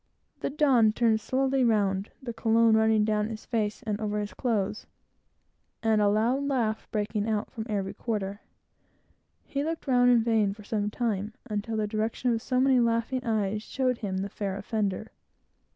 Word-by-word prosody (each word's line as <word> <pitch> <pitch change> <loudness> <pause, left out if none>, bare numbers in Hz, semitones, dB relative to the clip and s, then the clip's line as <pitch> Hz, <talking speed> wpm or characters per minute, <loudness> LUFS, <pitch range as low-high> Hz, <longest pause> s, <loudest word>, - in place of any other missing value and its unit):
The - - -2
Don 265 -7 +4
turned 220 -1 +2
slowly 265 +2 +1
round, 200 -4 +1
the 240 -2 -4
cologne, 225 0 +3
running 220 -1 +3
down 210 0 0
his 220 -1 -7
face, 215 0 -2
and 215 -2 -3
over 210 -1 -1
his 205 0 -4
clothes, 210 -4 -1 1.0
and 220 -1 +3
a 205 - +4
loud 230 +6 +2
laugh 230 -6 -1
breaking 210 0 -1
out 215 -1 -1
from 220 -1 -6
every 200 -2 -2
quarter. 205 -2 -3 1.0
He 280 0 -2
looked 325 +1 -3
round 245 -2 +4
in 240 -2 +5
vain, 220 -4 +2
for 210 - -13
some 210 -1 -1
time, 215 -2 -2
until 220 +1 -3
the 215 - +1
direction 220 +3 -1
of 225 - -1
so 255 +1 0
many 260 -1 +4
laughing 235 +2 0
eyes 215 -3 0
showed 255 +1 -1
him 195 -4 -3
the 195 +1 -2
fair 195 -1 -4
offender. 205 0 -2
220 Hz, 170 wpm, -28 LUFS, 210-240 Hz, 1.0 s, in